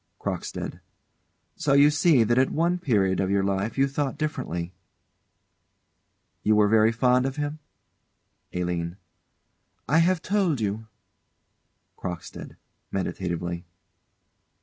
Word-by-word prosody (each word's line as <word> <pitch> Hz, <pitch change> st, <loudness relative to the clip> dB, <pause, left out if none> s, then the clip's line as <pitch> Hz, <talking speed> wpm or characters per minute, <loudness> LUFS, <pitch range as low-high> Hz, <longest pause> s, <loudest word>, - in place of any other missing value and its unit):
CROCKSTEAD. -, -, -4 dB, 0.8 s
So 145 Hz, -, +1 dB
you 140 Hz, +1 st, +6 dB
see 145 Hz, -4 st, +4 dB
that 120 Hz, +3 st, +2 dB
at 130 Hz, -, +3 dB
one 175 Hz, +3 st, +1 dB
period 100 Hz, -, +1 dB
of 95 Hz, -, 0 dB
your 100 Hz, 0 st, +2 dB
life 100 Hz, +4 st, -1 dB
you 135 Hz, +1 st, +4 dB
thought 140 Hz, 0 st, -2 dB
differently. 110 Hz, -, -3 dB, 1.7 s
You 110 Hz, -, +3 dB
were 105 Hz, -1 st, +5 dB
very 110 Hz, +1 st, +4 dB
fond 125 Hz, +2 st, +2 dB
of 135 Hz, -, -4 dB
him? 150 Hz, +1 st, -3 dB, 0.9 s
ALINE. 90 Hz, 0 st, -3 dB, 0.9 s
I 160 Hz, -, +4 dB
have 175 Hz, 0 st, +2 dB
told 185 Hz, -, +1 dB
you. 110 Hz, +1 st, -2 dB, 1.1 s
CROCKSTEAD. 90 Hz, -2 st, -7 dB, 0.3 s
[_Meditatively. 90 Hz, -2 st, -3 dB
115 Hz, 110 wpm, -26 LUFS, 95-145 Hz, 1.7 s, you